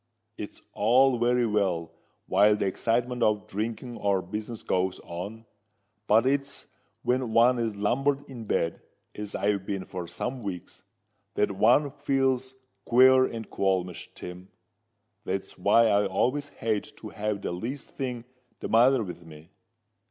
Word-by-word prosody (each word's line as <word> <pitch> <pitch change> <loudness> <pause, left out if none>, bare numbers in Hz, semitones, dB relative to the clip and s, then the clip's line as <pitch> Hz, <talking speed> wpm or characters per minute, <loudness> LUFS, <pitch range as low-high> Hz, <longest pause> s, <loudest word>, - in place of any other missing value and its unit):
"It's - - -8
all 125 +4 +4
very 120 +1 +3
well 95 -7 0 0.3
while 105 +2 +4
the 105 - -1
excitement 120 +5 0
of 105 -3 +2
drinking 115 +4 -4
or 100 -2 +1
business 110 +1 -6
goes 95 0 0
on; 100 +7 -7 0.6
but 110 +3 +5
it's 140 +1 -1 0.4
when 125 -2 0
one 120 +2 +5
is 115 -3 -1
lumbered 135 +7 0
in 120 -5 -8
bed, 85 -4 -1 0.3
as 105 -1 -6
I've 100 -1 0
been 95 -1 -4
for 90 -2 -6
some 125 +8 -4
weeks, 95 -5 -7 0.5
that - - +1
one 120 +9 +3
feels 135 -2 0 0.3
queer 130 +2 +6
and 115 -3 -6
qualmish, 95 -2 -1
Tim. 90 +1 -9 0.7
That's 95 +1 -4
why 105 +5 +5
I 100 -1 +3
always 130 +9 0
hate 110 -5 -2
to 110 - -8
have 105 -1 -3
the - - -2
least 115 +10 -5
thing 125 -3 -4 0.3
the - - -5
matter 120 +2 +5
with 90 -3 -8
me. 80 0 -14
110 Hz, 145 wpm, -27 LUFS, 100-125 Hz, 0.7 s, queer